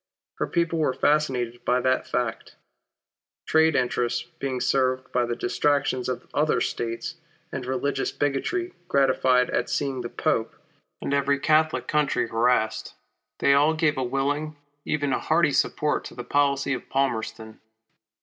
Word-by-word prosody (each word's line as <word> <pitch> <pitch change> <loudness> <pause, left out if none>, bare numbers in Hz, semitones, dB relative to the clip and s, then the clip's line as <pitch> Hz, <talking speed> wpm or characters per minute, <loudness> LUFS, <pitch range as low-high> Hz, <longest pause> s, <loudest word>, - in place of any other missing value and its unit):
Her - - 0
people 170 -1 0
were 140 -5 +1
fascinated 130 -6 0
by 125 +1 +2
that 130 +1 +1
fact. 120 -2 -3 0.9
Trade 160 -1 +3
interests 120 -2 0 0.2
being 130 -2 -2
served 130 0 0
by 125 -1 +1
the 120 - -2
distractions 135 0 0
of 125 - -4
other 150 -4 +2
States, 115 +8 -3 0.3
and 130 -2 -5
religious 135 +1 -1
bigotry 350 - -1
gratified 130 -4 +3
at - - -1
seeing 135 -3 -1
the 120 - -5
Pope, 115 0 -1 0.5
and 140 - -2
every 140 0 +2
Catholic 155 +2 +2
country 150 -6 +1
harassed, 115 -1 +1 0.4
they 140 - +4
all 150 +3 +4
gave 155 -2 +2
a 130 - -1
willing, 145 +4 -1 0.3
even 145 -3 0
a - - 0
hearty 160 -2 +2
support 150 +1 +1
to - - -9
the 125 - -6
policy 140 0 +1
of 130 - -6
Palmerston. 110 -4 -2
135 Hz, 145 wpm, -25 LUFS, 125-150 Hz, 0.9 s, they